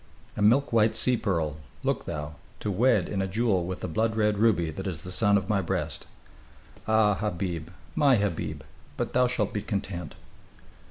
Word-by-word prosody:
"A - - -4
milk 120 +6 +4
white 110 -1 +4
sea 125 +3 +3
pearl, 85 -9 -1 0.3
look - - -1
thou; 75 0 -5 0.2
to 105 - -2
wed 120 +8 +3
in 100 -2 -2
a 95 - -1
jewel 95 -3 +1
with 95 -1 -5
the - - -3
blood 110 +7 0
red 105 -2 +1
ruby 90 -8 +3
that 95 +5 -5
is 80 -5 -4
the 90 - -7
son 100 +1 +3
of 95 -2 -3
my 100 -2 +2
breast. 85 - -3 0.8
Ah, 110 -1 +4
Habib, 90 -5 -3 0.2
my 140 - +4
Habib, 85 - -2 0.3
but - - -2
thou 125 0 +4
shalt 110 -5 -1
be 105 - -1
content!" 95 -6 -4
100 Hz, 180 wpm, -27 LUFS, 85-110 Hz, 0.8 s, milk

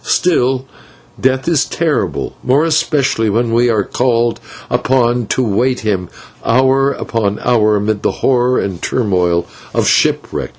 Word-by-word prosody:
Still, 130 -7 +1 0.6
Death 130 +2 +1
is 165 -4 +2
terrible, 160 -3 -2
more 140 +5 +2
especially 150 -8 +1
when 115 +2 0
we 120 +1 +3
are 110 -3 +1
called 120 +1 0 0.3
upon 120 -2 +1
to 130 - 0
await 125 +5 0
him 95 -5 -2 0.3
hour 130 +3 +2
after 105 -3 -2
hour 110 -3 +3
amid 105 0 -1
the - - +1
horror 125 -1 +1
and 95 -3 -3
turmoil 90 -7 0 0.3
of - - +2
a - - 0
shipwreck. - - +1
120 Hz, 140 wpm, -15 LUFS, 105-130 Hz, 0.6 s, we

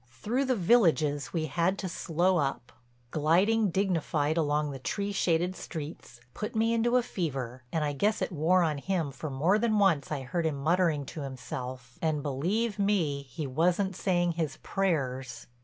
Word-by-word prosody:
Through 220 - -1
the 260 -1 +1
villages 165 -9 +3
we 165 -3 -1
had 170 +6 0
to 190 - -3
slow 175 +2 +1
up. 135 -5 -2 0.4
Gliding 190 +8 +3
dignified 165 -5 0
along 150 -2 +1
the 135 - -7
tree 200 +9 -2
shaded 180 -1 +1
streets 150 -8 -8
put 210 - -5
me 225 +1 +2
into 240 +2 +3
a 250 - +2
fever 135 - -4
and 160 -2 0
I 145 -1 -1
guess 210 +10 +1
it - - -2
wore 175 +3 +3
on 155 -3 0
him 170 -3 -1
for 145 +3 -6
more 160 +10 +2
than 220 -1 +2
once 170 -10 +2
I 140 -3 -2
heard 165 +6 -1
him 155 - -1
muttering 155 0 +1
to 155 - -7
himself, 130 -2 -7
and 155 -3 0
believe 190 - -1
me, 180 -9 +1
he 155 +4 -5
wasn't 175 +7 +1
saying 175 -2 +1
his 160 -4 -3
prayers. 135 -10 -1
165 Hz, 175 wpm, -29 LUFS, 145-195 Hz, 0.4 s, villages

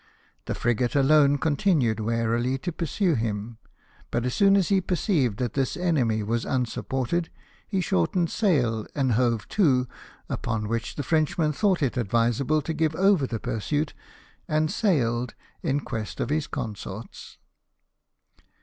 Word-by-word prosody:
The - - -3
frigate 120 +2 0
alone 145 0 +5
continued 145 - +1
warily 115 +3 0
to 175 +6 -4
pursue 170 +2 0
him; 110 -2 -3 0.5
but 120 +1 -1
as 125 - -1
soon 195 0 +5
as 190 - +1
he 195 -2 +3
perceived 165 - 0
that 120 -3 -2
this 135 -2 -1
enemy 130 -12 +1
was 115 +2 -1
unsupported, 130 +5 -1 0.4
he 195 -3 0
shortened 165 - +1
sail, 125 - +1
and 135 -4 +1
hove 115 -1 +1
to, 130 -11 +3 0.4
upon 115 -2 -2
Avhich 115 +1 -3
the 145 - -3
Frenchman 155 +1 +1
thought 190 -1 +1
it 130 -1 0
advisable 120 +6 +1
to 160 - -3
give 160 0 0
over 190 -5 +3
the 115 -3 -4
pursuit, 145 +10 -2 0.5
and 155 0 +1
sail 125 - +1 0.3
in 145 -3 0
quest 110 -5 -5
of - - -2
his 150 -1 0
consorts. 105 0 -7
135 Hz, 140 wpm, -26 LUFS, 115-160 Hz, 0.5 s, alone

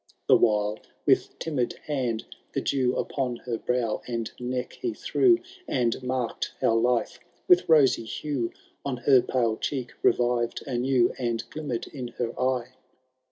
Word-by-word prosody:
The - - +6
while 105 -1 +2 0.3
with - - +2
timid 140 -7 -2
band 125 -7 -1 0.3
ibe - - 0
dew 130 -2 +1
Upon 130 -3 -1
her 120 -1 -4
brow 125 -3 -1
and 115 -2 -3
neck 125 0 -3
he 360 -2 -2
threw. 360 -3 +4 0.3
And 120 -1 0
marked 125 -2 -2
how - - +3
life 120 +1 +1 0.3
with 360 - +5
rosy 140 -7 +5
hae 135 -5 -2 0.3
On 135 -3 -2
her 130 +1 +5
pale 115 -4 0
cheek 130 -4 -3
revived 120 -1 +2
anew. 125 -1 +2
And 120 -2 -2
glimmerM 145 -7 -4
in 130 -4 -5
her 120 -2 -3
eye. 130 -1 0
125 Hz, 145 wpm, -27 LUFS, 120-135 Hz, 0.3 s, The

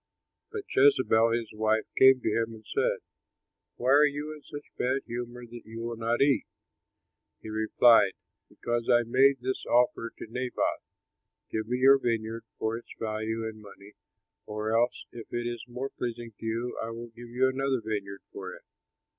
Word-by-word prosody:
But 430 -2 -4
Jezebel 395 - +5
his 115 -2 -2
wife 110 0 +1
came 130 -1 +7
to - - -3
him 115 0 -1
and 110 -1 -15
said, - - 0 0.7
"Why 125 +2 0
are 145 +2 +7
you 145 +2 -4
in 150 - -12
such 145 0 -11
bad 130 +2 0
humor 120 +1 -6
that 120 0 -10
you 115 +1 -9
will 120 0 -3
not 115 +3 +1
eat?" 140 -1 +2 0.9
He 110 - -9
replied, 110 -1 +5 0.4
"Because 120 0 -3
I 120 -1 +5
made 130 +3 +4
this 130 +1 -2
offer 120 -1 +2
to - - -7
Naboth, 125 +2 -2 0.7
'Give 110 0 -2
me 125 +2 0
your 135 +2 +6
vineyard 115 -2 -2
for 110 +1 -1
its - - -21
value 110 +1 -2
in 110 -1 -8
money, 100 0 -14 0.5
or 105 +1 -2
else, 120 +2 +1
if 115 -2 -10
it 120 0 -2
is 120 -1 -4
more 125 +3 -5
pleasing 120 -1 -5
to - - -8
you, 115 +2 -2
I 115 - -3
will 115 +1 -7
give 120 +1 -12
you 125 +2 +2
another 135 0 0
vineyard 100 -3 -5
for - - -7
it.' - - -16
120 Hz, 175 wpm, -28 LUFS, 110-125 Hz, 0.9 s, came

